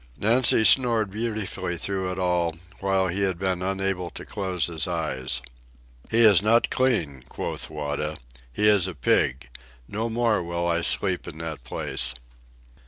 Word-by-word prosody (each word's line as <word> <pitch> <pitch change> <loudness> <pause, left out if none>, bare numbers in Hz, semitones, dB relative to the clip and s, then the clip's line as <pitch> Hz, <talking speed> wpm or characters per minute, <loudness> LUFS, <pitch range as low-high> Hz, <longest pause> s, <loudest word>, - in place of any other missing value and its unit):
Nancy 115 - +4
snored 115 -4 +4
beautifully 110 -5 -3
through 95 +1 -3
it 90 - -6
all, 90 -3 0 0.2
while 95 -1 +1
he 95 +3 -2
had 95 -3 0
been 95 -1 -2
unable 95 -1 -2
to - - -10
close 95 -6 -2
his 80 -3 -1
eyes. 65 0 -2 0.7
"He 115 - +3
is 105 -6 +7
not 115 +3 +3
clean," 85 - 0
quoth - - -4
Wada. 75 0 -4 0.3
"He 105 +11 +1
is 100 -4 +4
a 95 - -6
pig. 65 -1 0 0.4
No 110 +3 -3
more 115 -3 +1
will 85 0 -3
I 85 0 +1
sleep 95 +1 +3
in 80 - -8
that 80 -5 -6
place." 65 +1 -1
95 Hz, 155 wpm, -24 LUFS, 80-105 Hz, 0.7 s, is